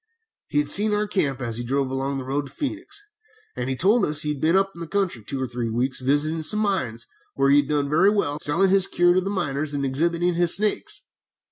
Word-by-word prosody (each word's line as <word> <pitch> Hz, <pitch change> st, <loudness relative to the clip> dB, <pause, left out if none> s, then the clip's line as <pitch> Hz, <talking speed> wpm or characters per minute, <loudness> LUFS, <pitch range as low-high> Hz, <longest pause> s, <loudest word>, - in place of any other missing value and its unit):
"He -, -, -3 dB
had 145 Hz, 0 st, +2 dB
seen 210 Hz, +7 st, +4 dB
our 210 Hz, 0 st, 0 dB
camp, 140 Hz, -10 st, -1 dB
as 115 Hz, -2 st, -3 dB
he -, -, -3 dB
drove 135 Hz, +2 st, -1 dB
along 135 Hz, +1 st, -2 dB
the 135 Hz, -, -5 dB
road 140 Hz, +2 st, -3 dB
to -, -, -13 dB
Phœnix, 315 Hz, +7 st, -6 dB, 0.5 s
and 125 Hz, +1 st, -4 dB
he 130 Hz, -, -1 dB
told 200 Hz, -, +2 dB
us 150 Hz, -2 st, +1 dB
he 150 Hz, -, -2 dB
had 140 Hz, -, -10 dB
been 165 Hz, +3 st, +2 dB
up 195 Hz, 0 st, +1 dB, 0.2 s
country 190 Hz, -, -1 dB
for 105 Hz, -, -26 dB
two 135 Hz, -, -3 dB
or 130 Hz, -, -1 dB
three 120 Hz, -1 st, -4 dB
weeks 125 Hz, +4 st, -2 dB
visiting 145 Hz, +5 st, 0 dB
some 210 Hz, +7 st, +1 dB
mines, 160 Hz, -, -2 dB, 0.3 s
where 135 Hz, -, +2 dB
he 140 Hz, -, +6 dB
had 145 Hz, 0 st, +1 dB
done 145 Hz, -1 st, 0 dB
very 160 Hz, +7 st, +3 dB
well, 155 Hz, -9 st, -1 dB
selling 185 Hz, +6 st, +2 dB
his 195 Hz, -1 st, +4 dB
cure 175 Hz, 0 st, +3 dB
to 185 Hz, -, +2 dB
the 195 Hz, -, -4 dB
miners 150 Hz, -6 st, -3 dB
and 140 Hz, -1 st, -2 dB
exhibiting 170 Hz, +6 st, 0 dB
his 170 Hz, 0 st, +4 dB
snakes. 210 Hz, +1 st, -2 dB
150 Hz, 240 wpm, -23 LUFS, 135-190 Hz, 0.5 s, he